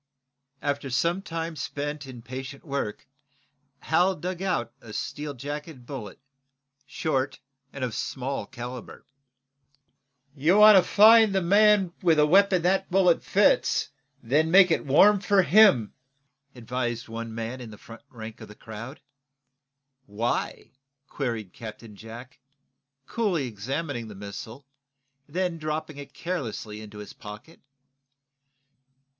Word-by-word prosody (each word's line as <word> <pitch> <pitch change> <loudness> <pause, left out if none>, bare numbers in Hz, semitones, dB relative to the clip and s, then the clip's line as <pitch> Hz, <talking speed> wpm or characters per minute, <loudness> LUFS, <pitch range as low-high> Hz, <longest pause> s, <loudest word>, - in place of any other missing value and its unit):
After 145 -1 -2
some 170 +9 0
time 165 -2 -5
spent 145 0 -5
in 125 -3 -10
patient 130 +3 -8
work 140 -8 -4 0.8
Hal 180 +4 +2
dug 180 +3 -5
out 145 - -1
a 110 -2 -11
steel 145 +4 -5
jacketed 145 0 -7
bullet, 120 -8 -7 0.7
short 135 -1 -2 0.3
and 140 - -6
of 125 -3 -2
small 135 +3 -4
calibre. 125 -1 -8 1.3
"You 155 +7 +3
want 210 0 +9
to 190 - +8
find 220 -1 +6
the 190 - +2
man 200 -1 +4
with 165 -3 +3
a 150 - +5
weapon 190 +2 +4
that 190 +2 +1
bullet 180 -2 +3
fits, 200 -6 +2 0.3
and 115 - -14
then 155 +3 +3
make 185 0 +7
it 160 - 0
warm 200 +9 +6
for 200 -1 +3
him," 175 - +5 0.6
advised 120 -1 -3
one 115 0 -6
man 115 +3 -5
in 120 - -8
the 105 - -11
front 115 +2 -13
rank 110 -2 -10
of - - -9
the 105 - -13
crowd. 115 +6 -9 1.1
"Why?" 110 +4 -3 0.3
queried 115 -9 -4
Captain 110 -1 -10
Jack, 115 +5 -11 0.7
coolly, 195 - -1
examining 120 +3 -4
the 105 - -10
missile, 105 +6 -9 0.6
then 175 +2 -2
dropping 155 -1 -4
it 140 -1 -9
carelessly 115 -11 -5
into 105 -1 -11
his 105 0 -9
pocket. 105 +10 -12
140 Hz, 130 wpm, -26 LUFS, 115-175 Hz, 1.3 s, want